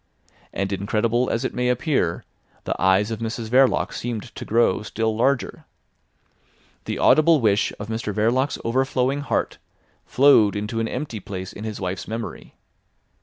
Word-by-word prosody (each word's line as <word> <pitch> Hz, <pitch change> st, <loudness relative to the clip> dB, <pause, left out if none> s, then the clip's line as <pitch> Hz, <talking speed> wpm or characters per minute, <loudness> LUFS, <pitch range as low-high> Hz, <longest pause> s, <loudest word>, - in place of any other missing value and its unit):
And 100 Hz, +1 st, -2 dB
incredible 110 Hz, +5 st, 0 dB
as 115 Hz, -, -1 dB
it -, -, -2 dB
may 125 Hz, 0 st, 0 dB
appear, 125 Hz, -, 0 dB, 0.4 s
the -, -, -1 dB
eyes 95 Hz, +3 st, +3 dB
of 110 Hz, -, -4 dB
Mrs 115 Hz, 0 st, -4 dB
Verloc 130 Hz, +2 st, +3 dB
seemed 115 Hz, -3 st, -5 dB
to -, -, -7 dB
grow 115 Hz, -4 st, +2 dB
still 110 Hz, +1 st, -2 dB
larger. 130 Hz, +3 st, 0 dB, 1.2 s
The -, -, -3 dB
audible 155 Hz, 0 st, +5 dB
wish 105 Hz, -4 st, +2 dB
of 105 Hz, -, -6 dB
Mr 110 Hz, -1 st, -3 dB
Verloc's 120 Hz, +7 st, +1 dB
overflowing 130 Hz, +3 st, 0 dB
heart 145 Hz, -, -2 dB, 0.5 s
flowed 125 Hz, -7 st, +5 dB
into 105 Hz, +2 st, -3 dB
an 115 Hz, -, -1 dB
empty 125 Hz, -2 st, -4 dB
place 95 Hz, -1 st, -7 dB
in 105 Hz, -, -8 dB
his 110 Hz, -1 st, -5 dB
wife's 95 Hz, -1 st, -4 dB
memory. 115 Hz, +1 st, -6 dB
115 Hz, 150 wpm, -23 LUFS, 105-125 Hz, 1.2 s, audible